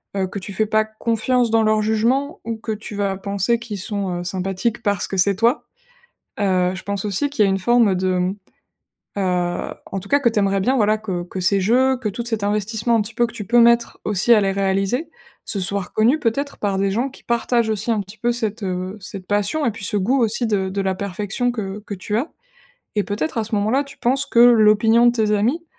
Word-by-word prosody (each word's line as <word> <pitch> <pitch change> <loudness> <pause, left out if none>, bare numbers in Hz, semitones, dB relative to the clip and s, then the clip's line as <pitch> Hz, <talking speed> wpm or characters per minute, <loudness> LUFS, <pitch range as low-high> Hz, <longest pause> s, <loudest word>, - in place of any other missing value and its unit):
heu, 190 -1 0
que 200 - -7
tu 195 +1 -8
fais 215 +2 0
pas 215 0 +2
confiance 230 +2 0
dans 225 0 +3
leur 215 0 +2
jugement 235 +7 0
ou 230 -1 -3
que 220 0 -4
tu 210 0 -8
vas 200 -1 -1
penser 200 +3 0
qu'ils 230 -3 -6
sont 195 -3 -2
heu, - - -5
sympathiques 190 +5 -2
parce 205 -1 0
que 195 - -4
c'est 195 +2 +3
toi. 230 +7 +1 0.8
Heu, 185 -2 +1
je - - -8
pense 200 -1 -3
aussi 210 +8 0
qu'il 280 -7 +1
y - - +3
a - - +2
une 195 - +1
forme 220 -1 +3
de 185 +1 0 0.8
heu, 180 -2 -1 0.2
en 195 - -2
tout 200 - -6
cas 285 - +3
que 245 - +3
tu 225 - -1
aimerais 195 -1 +1
bien, 255 +8 +1
voilà, 215 -2 +2
que 185 -5 -4
que 185 +1 -6
ces 195 +2 +3
jeux, 255 +6 +3
que 235 -4 -3
tout 230 +4 -4
cet 225 -3 -1
investissement, 215 +3 0
un 215 - +2
petit 215 +2 -8
peu, 240 - +2
que 235 - -12
tu 210 - -6
peux 240 +2 +4
mettre 235 0 +3
aussi 210 +3 +2
à 210 - +4
les 195 -1 +1
réaliser, 195 - -1 0.3
ce 205 - -4
soit 200 +2 0
reconnu, 225 - +1
peut-être, 280 +3 -1
par 200 -2 -1
des 195 0 +1
gens 240 +7 0
qui 270 - -17
partagent 235 -1 +1
aussi, 215 +2 -2
un 220 - +1
petit 195 +2 -9
peu, 240 - 0
cette, 225 -2 -3
heu, 185 +1 -3
cette 190 -1 -7
passion 205 +10 0
et 235 - +1
puis 210 -2 -9
ce 210 +1 -2
goût 245 +8 +1
aussi 230 +2 0
de 195 -3 0
de 195 +1 -2
la 190 -1 0
perfection 205 +5 -2
que 205 -3 -5
que 205 - -5
tu 205 +2 -3
as. 260 +8 -2 0.7
Et, 205 - +2
peut-être, 210 +6 -3
à 225 - 0
ce 220 +1 -4
moment-là, 220 +7 +1
tu 275 - -14
penses 265 +3 0
que 235 - +2
l'opinion 225 0 +6
de 240 - +5
tes 220 -3 0
amis, 240 +11 +1
210 Hz, 235 wpm, -21 LUFS, 195-235 Hz, 0.8 s, l'opinion